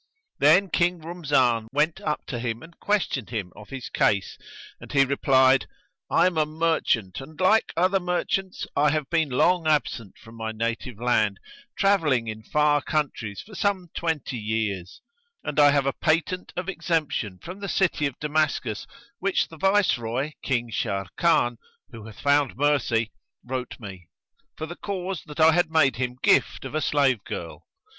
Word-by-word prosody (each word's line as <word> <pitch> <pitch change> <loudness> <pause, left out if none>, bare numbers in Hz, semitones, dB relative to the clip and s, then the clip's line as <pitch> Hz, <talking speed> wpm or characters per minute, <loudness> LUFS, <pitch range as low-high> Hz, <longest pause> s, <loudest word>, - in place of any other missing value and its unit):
Then 175 +6 +5
King 175 0 +2
Rumzan 145 -9 +1
went 150 +3 +1
up 150 -1 -2
to 120 - -4
him 115 -1 -3
and 165 +1 -14
questioned 195 - -1
him 105 -6 -4
of 105 0 -13
his 135 -3 -6
case 100 -1 +1 0.4
and - - -11
he 135 -1 +4
replied, 130 -1 +3 0.4
"I - - +4
am 180 -3 +1
a 155 - +3
merchant 155 - 0
and, 155 +5 -12
like 215 +4 +3
other 185 +3 +3
merchants, 185 +1 -2
I 150 +1 +4
have 150 -2 -2
been 160 -3 +2
long 165 +6 +2
absent 135 -9 0
from 115 - -15
my 110 0 -4
native 115 +1 -3
land, 110 -5 +1 0.4
travelling 155 -12 +2
in 110 0 -5
far 150 +5 +2
countries 135 -11 -2
for 215 - -15
some 190 -4 -1
twenty 160 -6 -2
years; 105 -4 -3 0.4
and - - -2
I 145 0 +8
have 140 -1 +2
a 135 - +1
patent 170 +3 0
of 180 +1 -4
exemption 160 - -1
from 180 - -9
the 200 -1 -5
city 170 -6 +1
of 135 - -8
Damascus 150 -8 -1 0.3
which 195 +1 0
the 160 - -12
Viceroy, 145 - +1
King 120 -3 -1
Sharrkan 115 - +1 0.3
(who 110 -2 -10
hath 110 - -12
found 145 -3 +2
mercy) 125 -6 +1 0.3
wrote 130 0 -5
me, 95 -6 -10 0.5
for 155 - -4
the 170 +2 -8
cause 190 -3 -4
that 150 +1 -9
I 160 +1 +7
had 175 0 +2
made 160 -5 +3
him 125 0 -2
gift - - +3
of 135 - -6
a 155 - 0
slave 135 -8 +2
girl. 85 -1 -7
145 Hz, 165 wpm, -25 LUFS, 115-165 Hz, 0.5 s, I